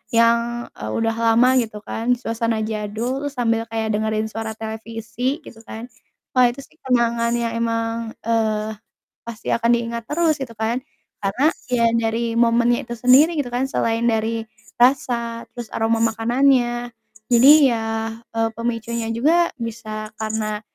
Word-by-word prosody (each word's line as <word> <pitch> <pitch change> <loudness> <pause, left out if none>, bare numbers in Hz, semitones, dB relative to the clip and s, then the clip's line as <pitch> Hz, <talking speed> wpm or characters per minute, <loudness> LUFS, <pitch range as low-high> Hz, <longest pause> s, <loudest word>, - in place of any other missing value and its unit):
yang, 235 +1 +3
eee, 105 - -6
udah 225 - 0
lama 230 +2 +4
gitu 220 -2 -6
kan 240 +2 0
suasana 230 -1 -1
jadul, 220 +6 -3
sambil 230 -4 0
kayak 220 -1 -1
dengerin 215 0 -1
suara 225 0 -4
televisi 225 +5 -4
gitu 225 - -13
kan, 225 +2 -7 0.5
wah, 255 -1 +6
itu 250 - -11
sih 315 - -21
kenangan 235 -2 +2
yang 235 -1 -1
emang, 230 0 -2
eee, 220 -1 0 0.5
pasti 230 -1 -8
akan 235 0 +1
diingat 235 0 -3
terus 325 0 +2
gitu 255 -4 -5
kan. 230 +3 -1 0.4
Karena 255 +11 +2 0.2
ya 235 -1 +3 0.2
dari 230 +1 -1
momennya 235 0 +3
itu 235 - -3
sendiri 270 +8 +5
gitu 275 - -1
kan 255 +2 0
selain 230 -3 0
dari 225 0 0 0.4
rasa, 235 -3 +2
terus 240 -2 -7
aroma 225 0 +1
makanannya, 240 +1 +2 0.4
jadi 245 +4 +7 0.2
ya, 225 -2 -1 0.5
eee, 225 0 +2
pemicunya 230 0 -3
juga 320 +9 +2
bisa 215 -2 -5
karena, 215 -1 -2
230 Hz, 140 wpm, -21 LUFS, 225-240 Hz, 0.5 s, jadi